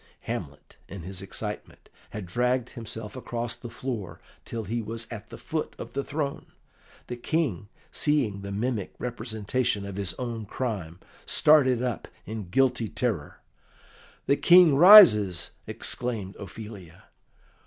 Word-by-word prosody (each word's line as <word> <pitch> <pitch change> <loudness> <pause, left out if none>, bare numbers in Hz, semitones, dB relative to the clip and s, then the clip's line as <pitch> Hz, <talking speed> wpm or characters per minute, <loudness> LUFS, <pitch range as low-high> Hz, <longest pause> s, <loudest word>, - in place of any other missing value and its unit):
Hamlet, - - -7
in 95 -3 -8
his 95 +1 -7
excitement, 95 - -6 0.2
had 105 -2 -6
dragged 125 +6 0
himself 110 -3 -7
across 120 -2 -4
the 120 - -9
floor 115 -7 -5 0.3
till 115 -1 -5
he 115 +3 -3
was 115 +1 -5
at 110 -3 -8
the - - -9
foot 155 -1 -4
of - - -8
the 140 - -2
throne. 145 -1 -4 0.6
The 120 - -6
King, 120 - -1 0.2
seeing 130 -10 0
the 100 0 -6
mimic 110 0 -2
representation 115 -2 -2
of 100 -1 -7
his 100 -3 -2
own 115 -4 -5
crime, 95 -9 -4 0.3
started 130 -5 +4
up 125 -4 -3 0.2
in 105 -3 -6
guilty 120 0 +2
terror. 105 -12 -3 0.8
"The 140 - +3
King 175 -4 +7
rises!" 135 - +8 0.2
exclaimed 110 -6 -2
Ophelia. 100 -4 -10
115 Hz, 130 wpm, -27 LUFS, 100-130 Hz, 0.8 s, rises